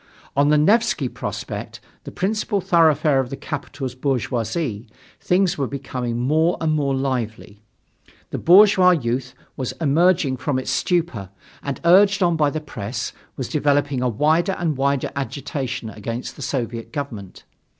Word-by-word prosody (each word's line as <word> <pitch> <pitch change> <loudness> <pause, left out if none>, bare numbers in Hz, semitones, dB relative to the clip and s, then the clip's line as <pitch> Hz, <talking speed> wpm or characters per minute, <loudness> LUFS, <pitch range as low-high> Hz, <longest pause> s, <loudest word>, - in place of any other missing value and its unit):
On 140 +1 +3
the 150 - +5
Nevsky 210 - +3
Prospect, - - -6 0.3
the - - -7
principal 210 +2 -1
thoroughfare 160 -6 +3
of 130 -2 -1
the 135 - -6
capital's 140 -3 -5
bourgeoisie, 125 -2 -2 0.3
things 180 -3 +1
were 135 - 0
becoming 125 -3 -4
more 155 +7 +2
and 160 -1 0
more 140 -3 0
lively. 115 -6 -3 0.7
The - - -3
bourgeois 190 +1 +6
youth 125 +1 -3 0.2
was 130 -2 -3
emerging 165 -2 +2
from 130 +1 -1
its 130 - -2
stupor 165 - -1 0.3
and, 140 -1 -4
urged 195 +3 +5
on 170 -1 +3
by 150 -2 +2
the 155 - -3
press, 115 -4 -5 0.2
was 130 - -3
developing 145 -3 +1
a 125 - +1
wider 155 - +2
and 165 -5 -1
wider 140 0 0
agitation 130 -4 -4
against 115 +4 -6
the - - -11
Soviet 120 -4 -3
government. 115 - -6
140 Hz, 145 wpm, -22 LUFS, 125-165 Hz, 0.7 s, bourgeois